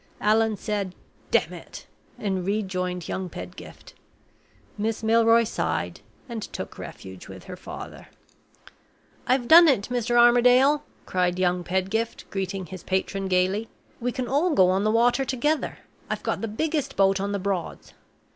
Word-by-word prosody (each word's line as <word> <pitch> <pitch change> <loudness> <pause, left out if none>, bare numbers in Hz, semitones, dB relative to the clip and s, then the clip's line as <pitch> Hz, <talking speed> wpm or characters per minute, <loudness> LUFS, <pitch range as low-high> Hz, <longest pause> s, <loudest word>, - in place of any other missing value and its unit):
Allan 220 0 +2
said: 200 -3 -3 0.3
"Damn - - +2
it," - - -10 0.3
and 190 -3 -2
rejoined 185 -3 -2
young 190 -1 -3
Pedgift. 90 - -10 0.8
Miss 220 +2 -2
Milroy 230 +1 +5
sighed, 225 - -2 0.3
and 235 -3 -5
took - - -7
refuge 95 -1 -9
with - - -10
her - - -8
father. - - -9 1.2
"I've 250 -1 +2
done 335 +3 +9
it, 250 -8 +2
Mr. 240 -1 -1
Armadale!" 250 +4 +5 0.2
cried 180 -1 0
young 180 -1 +1
Pedgift, 190 +6 -2
greeting 195 -1 -3
his 180 +2 -9
patron 190 +1 -2
gayly. 190 +4 +1 0.3
"We 245 +1 -1
can 250 0 -3
all 295 +6 +1
go 185 -1 +5
on 190 +2 +1
the 215 - +2
water 240 +4 +3
together; 285 +4 -1 0.3
I've - - -3
got - - -2
the 225 - -2
biggest 300 +7 -2
boat 195 0 +3
on 200 +1 -2
the 200 - 0
Broads. 190 -3 -4
210 Hz, 145 wpm, -25 LUFS, 185-240 Hz, 1.2 s, done